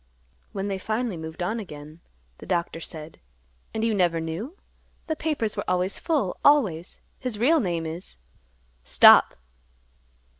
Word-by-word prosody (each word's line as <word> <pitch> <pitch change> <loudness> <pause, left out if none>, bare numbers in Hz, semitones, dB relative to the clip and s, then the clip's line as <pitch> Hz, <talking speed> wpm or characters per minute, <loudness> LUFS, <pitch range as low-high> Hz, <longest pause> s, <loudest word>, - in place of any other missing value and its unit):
When 195 0 -3
they 195 -1 -3
finally 220 +1 -2
moved 160 +2 -6
on 220 +6 -2
again, 155 -5 -10 0.4
the - - -11
Doctor 170 -2 -1
said, 160 -1 -9 0.5
"And 220 - -3
you 225 -1 +2
never 175 -4 +2
knew? 175 - -5 0.5
The 315 - -2
papers 300 -9 -2
were - - -3
always 180 +2 0
full, 300 - -1
always. 200 - +2 0.2
His 250 -5 -4
real 295 +9 +4
name 170 - -2
is—" 160 - -7 0.7
"Stop!" 60 - +7
190 Hz, 140 wpm, -25 LUFS, 165-230 Hz, 0.7 s, Stop